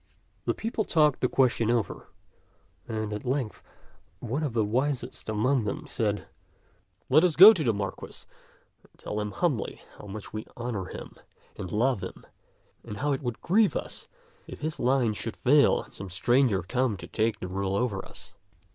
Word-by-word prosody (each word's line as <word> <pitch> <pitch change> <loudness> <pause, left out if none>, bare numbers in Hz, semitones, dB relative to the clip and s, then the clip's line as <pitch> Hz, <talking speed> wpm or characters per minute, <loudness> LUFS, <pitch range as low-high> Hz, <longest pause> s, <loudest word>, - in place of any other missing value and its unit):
The - - 0
people 225 0 -2
talked 150 -7 +3
the 125 - +3
question 120 -4 +2
over, 115 -3 -1 0.8
and 110 -2 -3
at 105 - -5
length 130 -3 -2 0.6
one 125 +6 -3
of 145 -6 -2
the 110 -2 +2
wisest 130 +2 -2
among 120 +4 +1
them 155 +10 -3
said, 110 -7 -1 0.4
" - - -40
Let 155 +5 +6
us 175 -4 +3
go 200 +6 +11
to 165 - -2
the 120 - +3
Marquis 100 -2 -5 0.6
and - - -26
tell 105 - -4
him 105 - -3
humbly 125 - -2 0.2
how - - -10
much 105 +1 -8
we 110 +1 -5
honor 120 -6 -3
him - - -9 0.4
and 90 - -6
love 120 0 +1
him - - -8 0.6
and 105 - -7
how 145 +5 0
it 135 - -1
would 120 -4 -4
grieve 205 +3 +3
us - - -4 0.4
if - - -9
his 155 +1 -3
line 125 -3 +2
should 110 +2 -5
fail 140 +2 +4
and - - -19
some 100 -1 -8
stranger 110 +2 +2
come 125 +2 0
to - - -9
take 110 0 -1
the 90 - -5
rule 95 +1 -2
over 100 -3 -1
us." - - -14
120 Hz, 180 wpm, -27 LUFS, 105-140 Hz, 0.8 s, go